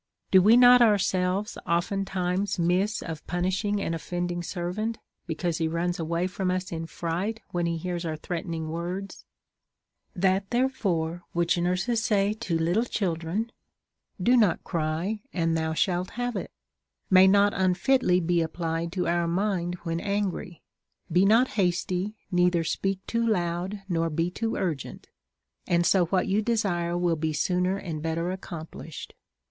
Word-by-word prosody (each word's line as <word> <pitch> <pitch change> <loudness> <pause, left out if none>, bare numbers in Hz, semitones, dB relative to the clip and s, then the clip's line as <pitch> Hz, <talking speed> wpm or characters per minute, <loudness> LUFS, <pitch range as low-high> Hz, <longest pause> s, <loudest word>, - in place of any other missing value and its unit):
Do 190 - +7
we 215 +5 +6
not 250 0 +8
ourselves 195 -2 +2
oftentimes 190 +2 0
miss 180 +5 +1
of 160 -2 -6
punishing 190 +4 0
an 165 - -2
offending 175 +1 -3
servant, 185 +6 -3 0.3
because 165 0 -2
he 165 - +1
runs 170 +2 -1
away 170 +2 -1
from 185 0 -2
us 185 0 -2
in 165 -1 -4
fright 180 +8 -3
when 175 -1 0
he 170 0 -1
hears 175 +1 -3
our 160 -2 -3
threatenino; 165 0 -4
words? 175 +5 -5 0.9
That 190 +1 +1
therefore 190 -10 0
which 170 -1 +2
nurses 185 +7 0
say 205 -1 +2
to 210 -7 -2
little 175 +8 +1
children 190 +2 -2 0.3
— - - -52
Do 250 - +6
not 210 -8 +3
cry, 170 +6 -2
and 165 -2 0
thou 160 0 -1
shalt 180 +1 0
have 245 -1 -2
it 195 - -4 0.3
— - - -52
may 185 0 +8
not 200 +1 +5
unfitly 185 +1 +2
be 170 0 +1
applied 165 0 -2
to 180 -2 -1
our 170 0 +1
mind 180 -1 -1
Avhen 165 -1 -3
angry. 200 -3 -3 0.5
Be 180 +4 +4
not 230 +5 +5
hasty, 185 +1 -1 0.2
neither 180 -1 +3
speak 195 +3 -2
too 230 0 0
loud, 185 -1 -1
nor 165 -3 0
be 165 +3 -1
too 225 +4 -2
urgent, 165 -8 -4 0.6
and 175 0 +2
so 180 0 +4
what 185 +2 +1
you 200 +2 +2
desire 195 -7 0
will 175 -1 +1
be 155 0 -2
sooner 180 +4 +1
and 165 -6 -5
better 165 +2 -1
accomplished. 165 -4 -8
180 Hz, 155 wpm, -27 LUFS, 170-200 Hz, 0.9 s, not